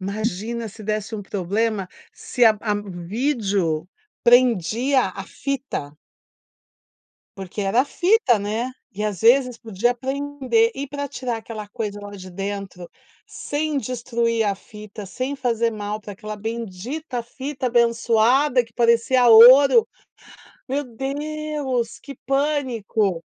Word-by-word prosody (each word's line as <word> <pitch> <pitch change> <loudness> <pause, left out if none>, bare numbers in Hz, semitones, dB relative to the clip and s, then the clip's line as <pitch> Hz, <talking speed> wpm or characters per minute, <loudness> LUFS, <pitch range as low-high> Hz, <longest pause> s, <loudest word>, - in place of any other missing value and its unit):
imagina 215 +3 -3
se 215 +2 -12
desse 215 +1 -3
um 205 - -5
problema, 200 +1 -1 0.2
se 245 - 0
a 220 -1 +6
a 210 -2 0 0.4
vídeo 200 - 0 0.4
prendia 245 +2 +4
a 195 - -5
fita? 270 - -4 1.5
Porque 190 +2 -6
era 205 +6 +2
fita, 355 - +3
né, 215 +4 -2 0.2
e 210 +1 -4
às 205 -5 -3
vezes 250 +1 +4
podia 230 +2 -1
prender 285 - 0
e, 280 0 -5
pra 285 0 -4
tirar 255 -4 -4
aquela 220 -2 -8
coisa 205 -2 -5
lá 205 0 -8
de 185 -2 -10
dentro 195 -2 -6 0.4
sem 295 0 -2
destruir 235 -3 -1
a 200 -2 0
fita, 210 0 -11
sem 255 +8 -4
fazer 235 -3 0
mal 210 -1 -4
pra 205 -1 -9
aquela 215 +2 -7
bendita 230 +5 -5
fita, 260 +2 -5
abençoada, 235 +2 +3
que 230 - -23
parecia 235 +2 +3
ouro. 265 - +8 0.8
Meu 280 +3 -1
Deus, 275 -1 -3
que 280 - -10
pânico! 250 - 0
230 Hz, 125 wpm, -22 LUFS, 210-265 Hz, 1.5 s, ouro